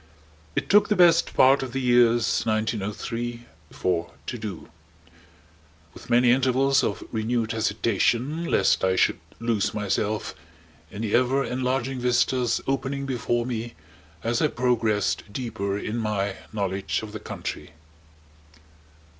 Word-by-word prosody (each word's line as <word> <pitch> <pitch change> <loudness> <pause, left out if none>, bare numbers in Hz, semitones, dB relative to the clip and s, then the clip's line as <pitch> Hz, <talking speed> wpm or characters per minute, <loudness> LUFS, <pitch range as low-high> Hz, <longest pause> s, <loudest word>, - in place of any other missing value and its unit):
It - - -1
took 205 +2 +5
the 210 - +3
best 170 -3 +4
part 135 +2 +5
of 130 -3 -5
the 135 - -1
years 120 -2 +3
1903 115 +2 -2 0.2
4 85 -2 -2
to 120 - -4
do; 105 -5 -6 1.3
with - - -13
many 120 0 +5
intervals 135 +1 +3
of 100 - -2
renewed 115 0 -1
hesitation, 115 - 0
lest - - +2
I 95 0 +2
should - - +2 0.2
lose 115 -4 0
myself 105 +1 -1 0.6
in 105 +2 -6
the 105 - -2
ever 130 +3 +3
enlarging 130 0 -2
vistas 125 0 +1
opening 135 +1 -2
before 120 -2 -1
me 120 -1 -4 0.5
as 115 +4 0
I 155 - +4
progressed 115 -6 0
deeper 100 -4 -3
in 105 +2 -4
my 105 -3 -1 0.2
knowledge 100 -1 -2
of 110 - -7
the 110 - -6
country. 75 - -6
120 Hz, 130 wpm, -25 LUFS, 105-130 Hz, 1.3 s, took